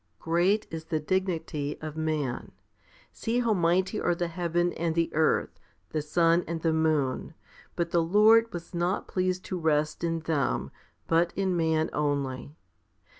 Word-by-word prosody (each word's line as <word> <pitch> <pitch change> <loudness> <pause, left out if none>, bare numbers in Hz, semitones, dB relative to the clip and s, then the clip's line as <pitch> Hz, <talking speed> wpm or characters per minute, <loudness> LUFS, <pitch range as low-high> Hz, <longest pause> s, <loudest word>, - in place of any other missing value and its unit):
Great 175 - +1
is 160 -1 -6
the 160 -1 -1
dignity 160 -4 -2
of 155 -1 -6
man. 155 -5 -2 0.6
See 230 +2 -2
how 230 -2 +2
mighty 185 +3 +1
are 175 - +1
the 175 -1 -2
heaven 175 0 0
and 165 -1 -2
the 170 0 0
earth, 160 +1 +1 0.3
the 155 - -1
sun 165 +3 +2
and 170 0 -3
the 165 -1 +2
moon; 155 -2 0 0.4
but 170 -1 -1
the 170 - +3
Lord 215 +6 +5
was 175 0 -8
not 175 +2 -1
pleased 185 0 -1
to 185 - -4
rest 155 -1 0
in 165 -1 -1
them, 155 -4 -1 0.3
but 165 +1 +2
in 190 -1 0
man 160 -1 +1
only. 145 -1 -2
165 Hz, 155 wpm, -28 LUFS, 155-180 Hz, 0.6 s, Lord